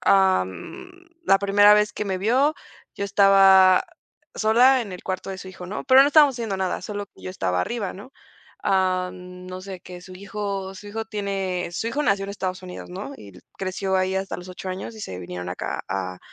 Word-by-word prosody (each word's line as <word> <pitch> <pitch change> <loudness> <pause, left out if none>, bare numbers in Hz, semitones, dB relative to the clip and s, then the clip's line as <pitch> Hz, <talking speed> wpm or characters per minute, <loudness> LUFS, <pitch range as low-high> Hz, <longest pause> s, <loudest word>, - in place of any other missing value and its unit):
am, 190 - +1 0.3
la 195 - +5
primera 205 +1 +6
vez 210 0 +2
que 210 - -4
me 190 -2 -2
vio, 260 +9 +2 0.4
yo 200 - -3
estaba 195 -2 +6 0.5
sola, 245 +4 +5
en 200 -4 -8
el 180 - -8
cuarto 185 +1 -4
de 190 - -6
su 190 - -9
hijo, 180 -1 -9
¿no?, 200 - -5
pero 260 0 +7
no - - +4
estábamos 290 -4 +5
haciendo 225 -5 -3
nada, 190 -1 -2
solo 205 +2 -5
que 95 - -21
yo 90 - -5
estaba 90 -1 -1
arriba, 215 - -3
¿no?, 215 +8 -12 0.5
am, 185 -1 -1
no 185 0 -7
sé, 190 -2 -8
que 180 0 -10
su 185 +1 -12
hijo 195 0 -5
su 205 - -11
hijo 220 +2 -4
tiene 195 -4 -3
su 200 - -3
hijo 290 +5 -1
nació 200 -6 +1
en 200 - -6
Estados 185 -2 -4
Unidos, 180 -1 -9
¿no?, 195 +9 -6
y 100 - -13 0.3
creció 190 0 -1
ahí 185 0 0
hasta 190 0 -2
los 180 +1 -10
ocho 185 +1 -7
años, 190 +5 -5
y 220 - -10
se 90 - -6
vinieron 90 0 -6
acá 90 - -4
a 95 -1 -3
190 Hz, 205 wpm, -23 LUFS, 185-210 Hz, 0.5 s, pero